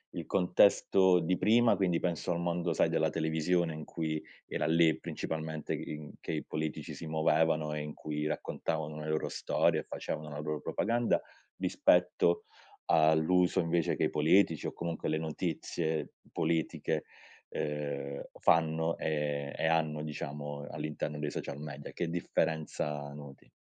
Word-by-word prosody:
il - - -4
contesto 95 0 +4
di 90 +2 +1
prima, 115 +2 +5
quindi 90 -3 +1
penso 90 0 -1
al 85 - 0
mondo, 85 0 0
sai, - - +3
della - - +2
televisione 80 +1 +1
in 75 0 -6
cui 80 -1 -3 0.3
era - - -1
lì 80 0 +4
principalmente 80 -1 -4
i - - -4
in 75 0 -9
che - - -4
i - - -2
politici 80 0 -4
si 80 - -7
muovevano 80 0 +2
e 75 - -2
in 75 0 -5
cui 75 0 -3
raccontavano 80 -1 -3
le 75 0 -5
loro 80 0 0
storie - - +1
e - - -14
facevano 75 -1 -5
la 75 - -6
loro 75 -2 -3
propaganda, 120 0 +1 0.4
rispetto 90 -1 +3 0.4
all'uso 80 +4 +4
invece 85 -1 +1
che - - -1
i - - +1
politici, 80 +1 +3
o - - -3
comunque 85 -2 -3
le 80 - +1
notizie 80 0 -2 0.2
politiche, 80 -1 0 0.4
ehm, 70 -2 -3 0.2
fanno 80 0 +3
e 75 -2 -1
e - - 0
hanno 80 -2 +1
diciamo 75 -1 -5
all'interno 75 0 -4
dei 75 -1 -2
social 70 0 -5
media. 70 -1 -7
Che 85 - -2
differenza 75 -3 -1
noti? 70 -2 -12
80 Hz, 150 wpm, -32 LUFS, 75-85 Hz, 0.4 s, prima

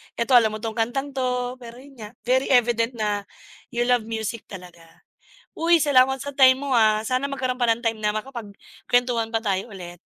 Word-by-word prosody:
eto 235 +3 -2
alam 220 -3 +5
mo 215 - -8
tong 225 -1 -4
kantang 270 +5 -2
to. 250 -1 -2
Pero 235 -1 -11
yun 275 -3 -17
nga 210 +2 -9
very 260 +2 +1
evident 240 -1 +2
na 205 -2 -2 0.5
you 240 - +1
love 240 -2 +1
music 225 0 -5
talaga. 175 -4 -13 0.5
Uy, 335 +1 +3
salamat 265 -2 +4
sa 285 - -6
time 260 -1 +6
mo, 275 - -3
ah. 215 -2 +3
Sana 255 +3 -1
magkaroon 260 -2 -3
pa 240 - +3
ng 230 +2 0
time 225 -2 -1
na 210 -1 0
makapag 215 -3 -7 0.3
kwentuhan 245 -2 +1
pa 225 0 -2
tayo 195 +1 -1
ulit. 180 -4 -9
235 Hz, 195 wpm, -23 LUFS, 215-255 Hz, 0.5 s, time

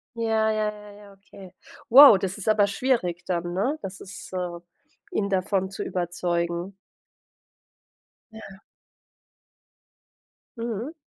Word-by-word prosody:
Ja, 220 -1 +1
ja, 215 -1 -1
ja, 210 0 -13
ja, 205 0 -15
okay. 195 -1 -15 0.4
Wow, 255 -5 +9
das 190 0 -3
ist 205 - -8
aber 210 -2 +4
schwierig 195 -6 -1
dann, 175 -1 -3
ne? 260 +12 -1
Das 190 0 -7
ist 195 +1 -10
äh, 180 -2 -4 0.5
ihn 200 - -1
davon 190 0 -1
zu - - -5
überzeugen. 175 0 -3 1.6
Ja. 195 -3 -12 2.0
Mhm. 230 +5 -4
195 Hz, 115 wpm, -25 LUFS, 180-220 Hz, 2.0 s, Wow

